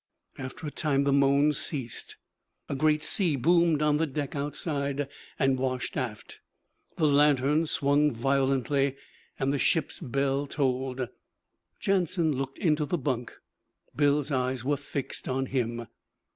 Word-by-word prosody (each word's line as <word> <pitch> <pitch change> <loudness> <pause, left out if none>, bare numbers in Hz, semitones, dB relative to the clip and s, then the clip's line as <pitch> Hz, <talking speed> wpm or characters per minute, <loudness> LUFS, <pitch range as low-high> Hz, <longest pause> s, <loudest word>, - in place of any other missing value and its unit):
After 130 +4 -7
a 150 - -4
time 140 -3 +1
the 140 0 +2
moans 140 +1 +4
ceased. 130 -7 -4 0.5
A - - -3
great 150 +2 +2
sea 175 -7 +2
boomed 165 +2 +3
on 150 -1 +3
the 160 +1 +1
deck 145 0 -4
outside, 140 -1 -2 0.3
and 135 -2 +2
washed 130 -1 -2
aft. 120 -6 -5 0.6
The 160 - +2
lantern 145 +1 +3
swung 145 +1 +2
violently, 135 +2 +1 0.4
and 135 +1 0
the 140 - 0
ship's 160 +2 +1
bell 140 -1 -1
tolled. 130 -2 -1 0.7
Jansen 175 -5 +1
looked 135 +1 -4
into 150 -3 +1
the 175 - 0
bunk; 125 -4 -2 0.6
Bill's 145 0 +2
eyes 130 -2 -1
were 145 +1 +1
fixed 140 -1 -4
on 130 +1 0
him. 120 -3 -2
140 Hz, 135 wpm, -28 LUFS, 130-150 Hz, 0.7 s, moans